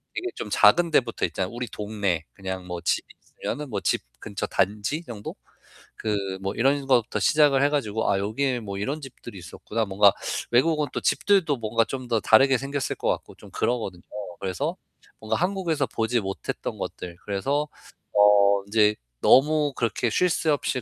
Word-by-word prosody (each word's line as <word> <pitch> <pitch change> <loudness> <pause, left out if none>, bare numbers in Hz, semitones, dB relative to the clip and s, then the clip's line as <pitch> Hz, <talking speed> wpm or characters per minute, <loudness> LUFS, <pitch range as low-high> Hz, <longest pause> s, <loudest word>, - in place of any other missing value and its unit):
이게 370 - -3
좀 - - -6
작은 170 -1 +5
데부터 120 -6 +2
있잖아요. 95 -1 -3
우리 120 0 -4
동네 100 -6 -2
그냥 95 -1 -6
뭐 90 -1 -5
집이 - - 0 0.4
있으면은 150 -1 -3
집 - - +1 0.2
근처 105 -2 -4
단지 105 - -1
정도? 110 -8 -8 0.6
그 105 -2 -1 0.2
뭐 95 0 -2
이런 135 +3 +2
것부터 120 -4 +2
시작을 145 -3 +4
해 145 - +4
가지고 110 -7 -1
'아 95 - +1
여기에 120 +5 -1
뭐 100 -3 -6
이런 135 +10 -2
집들이 120 -5 -10
있었구나.' 105 +5 -4
뭔가 100 +1 +5 0.4
외국은 150 +4 +3
또 - - -1
집들도 190 -8 +2
뭔가 115 0 +1
좀 130 +1 -6
더 115 - +2
다르게 135 +4 +5
생겼을 135 0 -3
것 - - -3
같고 - - -3
좀 - - -15
그러거든요. 115 -7 -2 0.4
그래서 95 -2 -2 0.4
뭔가 110 0 -2
한국에서 175 -6 0
보지 115 +2 0
못했던 95 0 -5
것들 90 -2 -6
그래서 135 +10 -1 0.5
어 100 -1 +5
인제 105 0 +3 0.3
너무 150 +1 +4
그렇게 115 0 0
쉴 180 +10 +2
새 160 -1 0
없이 130 -3 -1
115 Hz, 345 characters per minute, -25 LUFS, 100-140 Hz, 0.6 s, 작은